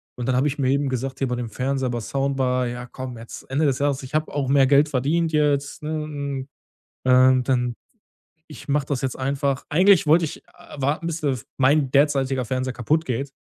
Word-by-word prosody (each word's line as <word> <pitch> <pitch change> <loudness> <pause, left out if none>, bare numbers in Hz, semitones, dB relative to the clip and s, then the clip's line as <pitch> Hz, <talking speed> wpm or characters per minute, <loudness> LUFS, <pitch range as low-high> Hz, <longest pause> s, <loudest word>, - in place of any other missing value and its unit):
Und 125 - -5
dann 130 - +1
habe 130 +4 +2
ich 145 0 -3
mir 130 -2 +1
eben 140 +1 +1
gesagt, 130 +1 -3
hier 135 - -1
bei 125 - -2
dem 120 -1 -4
Fernseher 130 +3 -2
bei 120 -1 -2
Soundbar: 130 0 -1
„Ja, 125 0 -5
komm, 125 0 -8
jetzt 115 +1 -11
Ende 145 +4 +1
das 135 -3 +1
Jahres. 140 -1 0
Ich 130 - -10
habe 155 +1 0
auch 140 -2 -2
mehr 135 -1 +5
Geld 140 +2 +5
verdient 155 +5 0
jetzt, 145 -2 0
ne? 150 - -5
Hm, 140 -3 -5 0.6
und 130 0 +5
dann 125 -2 +1 0.7
ich 150 - -11
mache 145 -1 +1
das 140 -4 -2
jetzt 130 -2 -2
einfach.“ 135 0 -1
Eigentlich 185 +2 +4
wollte 165 +3 +5
ich 155 - -6
a 145 - -12
warten, 145 +5 -1
bis 165 -1 -3
das 135 -7 -2
mein 135 +1 +3
derzeitiger 135 -2 +2
Fernseher 130 +2 -2
kaputt 150 +7 0
geht. 135 +1 -3
135 Hz, 210 wpm, -23 LUFS, 130-145 Hz, 0.7 s, mehr